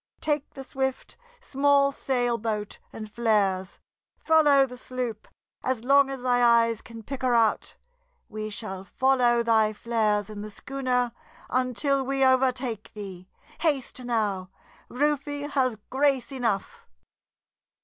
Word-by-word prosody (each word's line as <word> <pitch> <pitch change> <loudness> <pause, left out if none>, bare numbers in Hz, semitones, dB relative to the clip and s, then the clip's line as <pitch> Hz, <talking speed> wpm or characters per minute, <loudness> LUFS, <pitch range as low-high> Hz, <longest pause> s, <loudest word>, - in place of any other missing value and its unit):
Take 295 -2 -2
the 270 - -7
swift, 265 0 -3 0.3
small 280 - +3
sailboat, 235 -6 -2
and 215 - -7
flares; 205 -4 0 0.4
follow 295 -4 +5
the 250 -1 -10
sloop 250 -3 -5 0.4
as 255 -3 -1
long 275 +1 +5
as 270 -2 -6
thy 245 -1 +2
eyes 230 -2 +4
can 230 -2 -11
pick 275 +4 -6
her 250 -2 +2
out; 225 -2 +1 0.5
we 215 0 -5
shall 205 -3 -6
follow 245 +2 +2
thy 220 -2 +3
flares 215 -2 0
in 210 -1 -7
the 215 - -6
schooner 250 +1 -2 0.4
until 255 +2 +1
we 270 0 +1
overtake 255 -4 +1
thee. 190 -3 -8 0.3
Haste 280 -5 -1
now; 210 -6 -1 0.4
Rufe 290 +1 -1
has 255 -5 +1
grace 275 -1 +1
enough!" 230 -7 -3
245 Hz, 125 wpm, -26 LUFS, 215-270 Hz, 0.5 s, follow